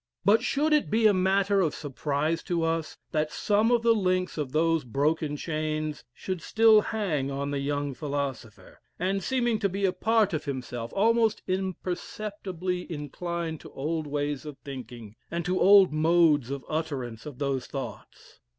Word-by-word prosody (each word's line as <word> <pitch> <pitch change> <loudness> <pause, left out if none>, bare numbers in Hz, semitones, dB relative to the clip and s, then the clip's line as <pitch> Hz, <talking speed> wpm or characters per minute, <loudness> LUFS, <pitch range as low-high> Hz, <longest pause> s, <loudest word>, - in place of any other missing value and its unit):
But 210 +3 +5
should 305 +2 +1
it 300 - +2
be 220 +2 +2
a 210 - +7
matter 195 +1 +2
of 160 -5 0
surprise 145 +2 -2
to 170 -3 0
us 165 -1 -1
that 155 0 0
some 210 +2 +2
of 240 -1 +3
the 230 0 +5
links 185 -3 0
of 145 -4 -3
those 165 0 +2
broken 150 +4 0
chains 155 -1 -3
should 185 +7 -5
still 220 +3 +5
hang 180 -12 -1
on 140 +1 -3
the 140 - -1
young 145 0 -2
philosopher, 140 -6 -5 0.2
and, 195 +2 0
seeming 240 0 0
to 200 -2 +1
be 195 +2 -1
a 185 - +2
part 215 +1 +2
of 155 - -2
himself, 125 -4 -5
almost 225 +2 +3
imperceptibly 185 0 -3
incline 165 +2 -4
to - - -12
old 155 +2 -2
ways 145 -1 -2
of 150 -3 -8
thinking, 120 -5 -8
and 170 0 -3
to 185 0 0
old 195 -3 +7
modes 155 -4 +3
of 140 -1 -5
utterance 135 -7 -4
of 145 -4 -8
those 135 -2 -2
thoughts! 135 -1 -8
165 Hz, 165 wpm, -27 LUFS, 145-195 Hz, 0.2 s, a